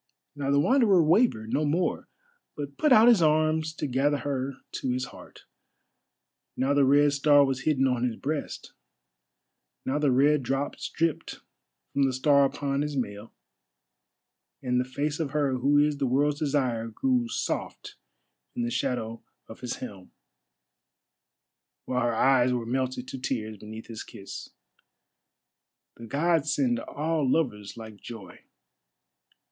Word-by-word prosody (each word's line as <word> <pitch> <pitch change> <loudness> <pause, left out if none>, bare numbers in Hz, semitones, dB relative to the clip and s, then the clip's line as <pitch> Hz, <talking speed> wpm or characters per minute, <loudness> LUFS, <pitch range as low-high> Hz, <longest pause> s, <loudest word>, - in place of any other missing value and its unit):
Now 140 -1 -3
the 140 0 +3
Wanderer 205 - +4
wavered 155 - +2
no 155 - +1
more, 160 +5 -1 0.5
but 140 -1 -6
put 300 - +1
out 225 -1 +7
his 235 -7 +6
arms 155 0 +2
to - - -3
gather 140 +2 +1
her 135 0 -3 0.2
to 130 - -3
his 125 +1 -1
heart. - - -14 1.1
Now 135 +2 +1
the 145 -1 +4
Red 145 +1 +4
Star 145 0 +5
was 130 -1 -3
hidden 135 -4 +2
on 125 -2 0
his 120 -3 0
breast, 145 +4 -5 1.1
now 135 +3 0
the 145 -3 +2
red 145 +3 +4
drops 135 +3 -3
dripped 165 -1 -2 0.5
from 140 - 0
the 135 -1 +2
Star 140 +2 +4
upon 140 0 -2
his 150 -1 -3
mail, 105 -3 -4 1.3
and 125 -1 +1
the - - -3
face 145 +4 -3
of 150 -3 -3
her 140 -4 +1
who 140 +3 +3
is 145 0 +3
the 135 - +1
World's 145 +3 +1
Desire 130 -6 0
grew 245 - 0
soft 240 - -4 0.6
in 240 - -2
the 240 - -2
shadow 115 - -2 0.3
of 110 - -11
his 125 -1 -4
helm, 95 -3 -9 1.7
while 125 0 -1
her 120 -1 0
eyes 130 0 +4
were 120 -2 -1
melted 130 +1 -2
to 135 - -6
tears 110 -4 -3
beneath 110 +2 -9
his 115 -2 -8
kiss. 100 - -9 1.5
The 115 - -10
Gods 155 +3 +1
send 125 -4 +1
all 150 +1 -1
lovers 105 -11 -1
like 110 -2 -9
joy! 100 -4 -11
140 Hz, 145 wpm, -27 LUFS, 125-150 Hz, 1.7 s, out